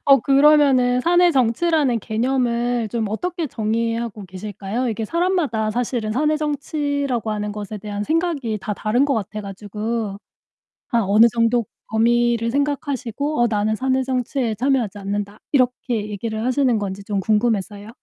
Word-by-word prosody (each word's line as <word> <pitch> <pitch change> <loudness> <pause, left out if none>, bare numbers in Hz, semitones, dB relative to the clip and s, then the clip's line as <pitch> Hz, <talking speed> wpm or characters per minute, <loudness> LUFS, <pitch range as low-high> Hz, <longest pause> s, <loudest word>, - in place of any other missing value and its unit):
어 275 -1 +7
그러면은 275 -3 +4
사내 350 +4 +4
정치라는 265 0 +2
개념을 240 +1 0
좀 225 0 -2
어떻게 340 - -3
정의하고 230 -2 -2
계실까요? 205 +5 -4
이게 225 0 -2
사람마다 330 - 0
사실은 230 -1 -2
사내 300 +5 +1
정치라고 285 -5 -2
하는 210 0 -3
것에 210 0 -6
대한 205 0 -5
생각이 300 -6 -1
다 210 +2 -3
다른 230 +6 +1
것 285 -1 +1
같아 215 -1 -3
가지고. 210 +1 -4 0.7
아 235 - +2
어느 210 +1 +5
정도 230 0 +2 0.2
범위를 235 +1 +2
생각하시고 280 0 -1
어 240 - +4
"나는 215 0 0
사내 260 +2 0
정치에 250 -2 -1
참여하지 240 -3 0
않는다." 205 +1 -4
이렇게 250 -5 0
얘기를 220 +2 -4
하시는 255 -3 +2
건지 200 -1 -5
좀 200 0 -2
궁금해서요. 210 0 0
235 Hz, 345 characters per minute, -21 LUFS, 215-270 Hz, 0.7 s, 어